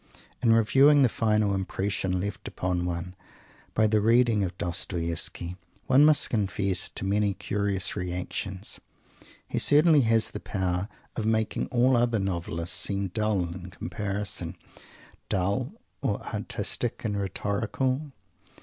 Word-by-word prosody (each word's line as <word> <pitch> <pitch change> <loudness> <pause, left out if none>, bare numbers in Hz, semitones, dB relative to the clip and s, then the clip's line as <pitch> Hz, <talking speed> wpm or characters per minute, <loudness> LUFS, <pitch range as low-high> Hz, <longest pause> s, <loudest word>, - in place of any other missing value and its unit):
In 120 -2 +4
reviewing 135 +6 +5
the 125 - +4
final 105 -2 +1
impression 95 -1 -1
left 100 +2 -5
upon 90 -1 -2
one 90 +1 -4 0.6
by 110 - +4
the 110 0 +3
reading 115 -1 +4
of 90 -1 -4
Dostoievsky 85 0 -2 0.3
one 135 +3 +5
must 150 -1 +4
confess 100 -4 0
to - - -6
many 100 0 +1
curious 100 -2 -1
reactions. 90 +1 -4 0.7
He - - -2
certainly 150 0 +6
has 115 -2 +2
the - - -5
power 95 0 -2 0.3
of 110 - -2
making 110 -1 0
all 125 +1 +3
other 120 -1 +2
novelists 85 -3 -2
seem 100 -1 0
dull 105 -1 0
in 90 +1 -7
comparison; 100 -2 -3 0.7
dull 100 0 0 0.3
or - - 0
artistic - - -2
and 105 -2 -1
rhetorical. 110 - -2
100 Hz, 125 wpm, -27 LUFS, 90-115 Hz, 0.7 s, certainly